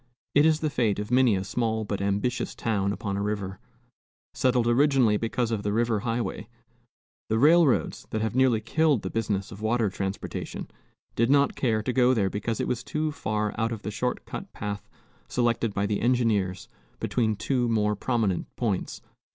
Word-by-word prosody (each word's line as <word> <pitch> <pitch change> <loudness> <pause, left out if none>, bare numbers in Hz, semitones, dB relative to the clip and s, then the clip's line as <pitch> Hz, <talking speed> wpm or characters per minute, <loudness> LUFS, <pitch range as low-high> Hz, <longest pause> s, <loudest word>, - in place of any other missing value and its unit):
It 145 +2 +6
is 155 -1 +2
the 155 -2 0
fate 115 -7 +1
of 105 +2 -5
many 125 -4 +4
a 95 - -1
small 110 +1 -1
but 100 -1 -3
ambitious 100 +5 -1
town 100 -3 0
upon 100 -2 -3
a - - -1
river. 100 -2 -3 0.7
Settled 125 -2 +2
originally 125 -2 +4
because 115 +2 -1
of 110 -3 -1
the 105 - -1
river 115 0 +1
highway, 115 +2 -3 0.8
the 110 - +2
railroads 155 +2 +3
that 110 - -2
have 110 +1 -1
nearly 130 -4 +3
killed 150 +2 +2
the 95 - -4
business 105 -3 -2
of 100 - -10
water 110 -2 +1
transportation 95 0 -4 0.5
did 115 +1 +2
not 140 0 +4
care 110 -4 0
to 125 - -1
go 125 0 +4
there 100 -4 +1
because 110 +2 -2
it - - -1
was 125 -1 -2
too 155 0 -2
far 105 -6 -2
out 115 +1 0
of 110 -2 -5
the 105 - -3
short 125 +5 -2
cut - - -7
path 100 0 -5 0.4
selected 120 -2 0
by 100 0 -1
the 100 0 -1
engineers 110 -7 +1 0.3
between 110 -3 0
two 120 +3 0
more 105 -2 +1
prominent 105 -4 0
points. 105 -6 -2
115 Hz, 180 wpm, -26 LUFS, 105-125 Hz, 0.8 s, It